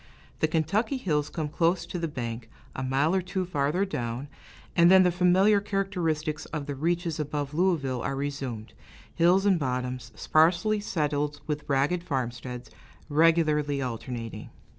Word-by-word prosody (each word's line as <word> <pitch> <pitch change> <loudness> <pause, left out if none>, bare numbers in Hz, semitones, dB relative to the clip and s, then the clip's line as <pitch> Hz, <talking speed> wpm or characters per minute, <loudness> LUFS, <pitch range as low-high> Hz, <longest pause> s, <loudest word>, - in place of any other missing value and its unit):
The 155 - +3
Kentucky 195 - 0
hills 150 - -1
come 155 -3 -3
close 170 +4 +1
to 180 - -5
the 165 - -1
bank, 115 -5 -5 0.3
a - - -3
mile 135 +5 +1
or 190 - +2
two 185 +1 -3
farther 165 +3 0
down, 125 -5 -4 0.5
and 170 0 +6
then 190 0 +8
the 180 - +3
familiar 185 +4 +4
characteristics 175 -7 -2
of 150 -2 -4
the 145 - -4
reaches 165 +3 -1
above 145 -1 -3
Louisville 150 -8 +1
are 135 - -2
resumed 135 -6 -4 0.4
hills 180 +4 +4
and 190 -4 +4
bottoms, 125 -2 -3
sparsely 175 +7 +3
settled 150 -6 -1
with 150 -1 -4
ragged 145 +6 +2
farmsteads, 125 -4 -4 0.4
regularly 150 -2 +3
alternating. 120 -2 -5
155 Hz, 145 wpm, -27 LUFS, 135-180 Hz, 0.5 s, then